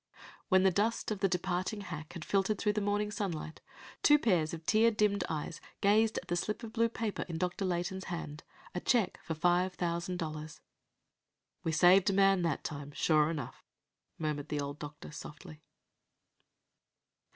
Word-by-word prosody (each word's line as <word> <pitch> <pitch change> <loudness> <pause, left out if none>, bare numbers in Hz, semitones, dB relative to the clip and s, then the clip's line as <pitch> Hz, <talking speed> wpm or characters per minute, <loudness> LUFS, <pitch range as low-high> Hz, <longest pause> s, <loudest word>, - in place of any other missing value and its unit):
When 190 -2 +5
the 190 - +5
dust 215 +5 0
of 210 - -2
the 195 - +3
departing 185 +3 -1
hack 160 -3 -7
had 170 -3 -7
filtered 200 +1 +1
through 210 +1 +1
the 210 - -1
morning 205 +1 0
sunlight, 175 -8 -4 0.4
two 295 - +7
pairs 180 - +2
of 165 -1 -7
tear 225 +5 +5
dimmed 210 -2 +1
eyes 160 +1 -4 0.2
gazed 215 +2 +3
at 180 - -5
the 175 - 0
slip 210 +6 -2
of 225 -1 -7
blue 230 0 +2
paper 225 -2 -3
in 165 - -3
Dr. 180 +3 -1
Layton's 185 +1 -2
hand, 165 -3 -6 0.3
a 180 - -2
check 220 -2 +1
for 160 - -3
five 180 +3 +2
thousand 175 +1 -2
dollars. 155 -2 -5 1.0
"We 165 - 0
saved 180 +5 +6
a - - +1
man 195 -1 +4
that 165 -4 -1
time, 145 -1 -5
sure 155 0 +3
enough!" 145 -7 -5 0.5
murmured 150 -2 -3
the 150 - -1
old 140 +1 -4
doctor 145 0 -8
softly. 155 +1 -10
180 Hz, 170 wpm, -32 LUFS, 160-205 Hz, 1.0 s, two